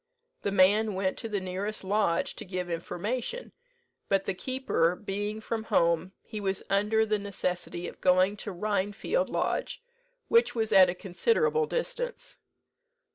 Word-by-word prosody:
The 200 - -1
man 200 +2 +4
went 190 0 0
to 225 - -5
the 205 -2 0
nearest 190 +3 -4
lodge 190 -3 +1
to - - -5
give 180 -3 -4
information; 230 - -3 0.6
but 195 -1 +3
the 195 - -2
keeper 185 -5 0
being 205 +2 -4
from 220 0 -4
home, 170 0 +2
he 215 -2 -6
was 195 -1 -1
under 210 +3 +3
the 215 -1 0
necessity 180 -3 -3
of - - -10
going 185 +2 +4
to 205 - -5
Rhinefield 205 - -1
Lodge, - - -1 0.5
which 465 - +4
was 220 -2 0
at 185 -2 +8
a 175 - -2
considerable 455 - +1
distance. - - -4
205 Hz, 145 wpm, -29 LUFS, 185-220 Hz, 0.6 s, at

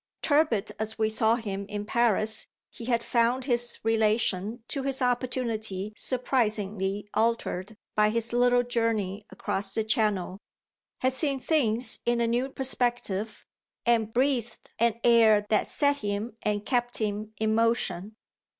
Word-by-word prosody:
Tepid 285 -9 +2
as 220 0 -3
we 220 -1 +1
saw 220 +1 +2
him 200 -4 -4
in 205 0 -4
Paris 220 -1 +2 0.2
he 230 - -9
had 235 -1 +1
found 240 +2 +1
his 240 -2 +2
relation 220 -1 0
to 275 - -3
his 270 0 -1
opportunity 235 -5 -1
surprisingly 210 -6 -1
altered 220 -3 -1 0.2
by 210 0 +3
his 230 +1 -2
little 245 0 +4
journey 225 -4 -1
across 195 -1 -2
the 220 - +1
Channel, 210 -4 0 0.6
had 260 0 +2
seen 275 0 +1
things 250 -6 +1
in 240 0 +1
a 235 - +2
new 240 +3 0
perspective 240 -6 -2 0.4
and 230 -2 +2
breathed 245 -2 -1
an 230 0 +2
air 220 -3 +5
that 215 - +2
set 285 -1 +1
him 210 0 -3
and 210 0 -1
kept 245 -1 0
him 215 0 -3
in 220 +1 0
motion. 225 -3 0
225 Hz, 140 wpm, -27 LUFS, 210-245 Hz, 0.6 s, air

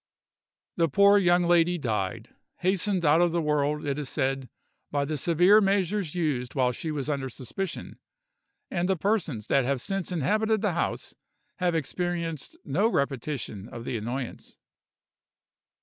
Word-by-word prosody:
The 165 -2 +3
poor 200 +6 +6
young 175 -1 +4
lady 175 0 +3
died, 110 - -2 0.3
hastened 185 0 +1
out 150 +3 +5
of 175 -1 +3
the 170 - 0
world, 150 -1 0
it 140 0 -1
is 145 -2 -4
said, 135 -3 -1 0.4
by 145 -1 0
the 155 +2 -2
severe 175 +8 +5
measures 195 -3 0
used 145 -8 -1
while 130 -2 +2
she 160 +6 -5
was 145 -3 -3
under 140 -3 -2
suspicion; 155 +10 -6 0.7
and 175 +1 0
the 190 - +2
persons 170 - -1
that 135 +3 +2
have 135 +1 0
since 195 +6 -3
inhabited 215 +7 +1
the 205 -5 +1
house 170 - -2 0.4
have 180 -3 +1
experienced 165 0 -3
no 175 +11 +2
repetition 135 - -2
of 115 0 -8
the - - -3
annoyance. 120 +3 -5
160 Hz, 150 wpm, -27 LUFS, 135-180 Hz, 0.7 s, poor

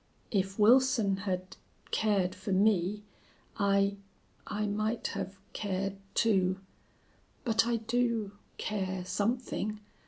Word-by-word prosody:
"If 195 -2 0
Wilson 230 -2 +5
had 185 0 -3 0.3
cared 200 -4 +2
for 205 - -5
me 200 0 +2 0.5
I 200 -1 +2 0.5
I 210 0 -1
might 215 +3 -1
have 195 +1 -4 0.2
cared, 195 -1 -2 0.2
too.... 190 -5 +3 0.9
But 225 -2 +3
I 240 - +2
do 230 -2 0 0.3
care 190 -3 -2
something. 210 +2 -1
205 Hz, 100 wpm, -31 LUFS, 195-225 Hz, 0.9 s, Wilson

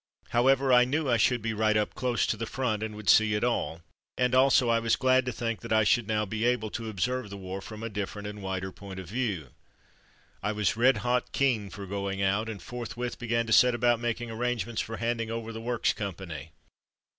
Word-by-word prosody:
However, 130 +2 +3
I 125 0 +7
knew 145 +4 0
I 120 -2 +3
should 120 +1 +2
be 115 -1 -1
right 110 0 +2
up 105 - 0
close 120 -3 0
to - - 0
the 115 +1 -4
front, 120 -5 -1
and 110 -1 -4
would 105 -2 -9
see 105 +5 +5
it 105 - -1
all, 115 -8 -1 0.4
and 125 0 +1
also 130 -1 +5
I 115 0 +3
was 115 0 +2
glad 130 0 +3
to - - 0
think 115 -1 -3
that 115 - -8
I 110 0 +5
should 115 +1 +2
now 105 -1 0
be 110 +2 -3
able 120 -3 +1
to 115 -1 -4
observe 120 +3 -2
the 100 - -7
war 95 0 -6
from 110 +2 -9
a - - -2
different 105 0 -5
and 105 0 -7
wider 95 0 -3
point 95 0 -9
of 95 - -8
view. 100 - -2 0.9
I 105 +2 -1
was 105 -1 +1
red 125 +2 +4
hot 125 +1 +1
keen 120 -7 +1
for 100 0 -8
going 100 0 -3
out, 100 +3 +1
and 105 -3 -6
forthwith 120 0 -5
began 115 -1 0
to 110 - 0
set 125 +1 +6
about 120 0 +2
making 120 0 -3
arrangements 120 0 -2
for 115 0 -5
handing 115 -1 -1
over 115 0 -4
the 115 - -6
Works 120 0 0
company. 85 -7 -6
115 Hz, 225 wpm, -28 LUFS, 105-120 Hz, 0.9 s, I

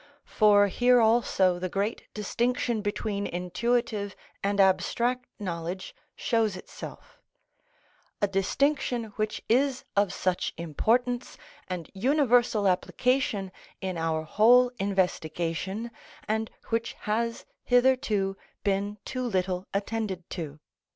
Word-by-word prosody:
For 205 -2 +5
here 245 +5 +4
also 220 -6 +3
the 185 0 -2
great 200 +5 -2
distinction 235 +2 0
between 205 -1 -2
intuitive 205 +3 -1 0.3
and 200 0 0
abstract 235 +7 +2
knowledge 175 -1 -4 0.2
shows 220 -5 +1
itself; - - -10 1.0
a 205 - +2
distinction 230 +3 0
which 215 0 -2
is 260 +2 +2
of 200 -1 +3
such 185 -1 -1
importance 240 - 0 0.3
and 180 -3 -4
universal 245 -2 +3
application 205 +1 +1 0.3
in 190 -1 -3
our 160 -1 -1
whole 245 +9 +5
investigation, 190 +2 -1 0.4
and 220 +1 0 0.2
which 230 0 -1
has 230 +2 -1 0.2
hitherto 245 -6 +2 0.3
been 200 +1 0
too 255 - -3
little 185 -5 -1
attended 200 -3 -3
to. 155 -4 -5
205 Hz, 105 wpm, -28 LUFS, 185-235 Hz, 1.0 s, For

